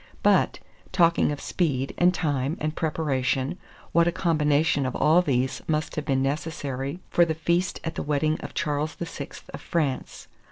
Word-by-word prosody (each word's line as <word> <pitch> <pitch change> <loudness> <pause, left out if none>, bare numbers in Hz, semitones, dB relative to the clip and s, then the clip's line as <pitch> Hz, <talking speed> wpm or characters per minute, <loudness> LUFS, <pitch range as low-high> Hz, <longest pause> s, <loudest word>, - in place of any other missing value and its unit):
But, - - +4 0.3
talking 170 -3 +3
of 145 - -4
speed, 135 -7 -1
and 180 +1 +4
time, 145 -4 -1
and 155 0 -2
preparation, 145 0 -1 0.3
what 170 0 +4
a - - +3
combination 155 -4 +2
of 130 - -4
all 160 +4 +5
these 130 -6 0
must 155 -1 -1
have 150 - -3
been 135 -2 +1
necessary 140 0 -3
for 175 - +5
the 160 -2 0
feast 170 +3 0
at 165 - -3
the - - -4
wedding 150 +1 0
of - - -8
Charles 150 0 -1
VI. 165 -4 -6 0.3
of - - -7
France. 150 -6 -2
150 Hz, 165 wpm, -26 LUFS, 140-165 Hz, 0.3 s, all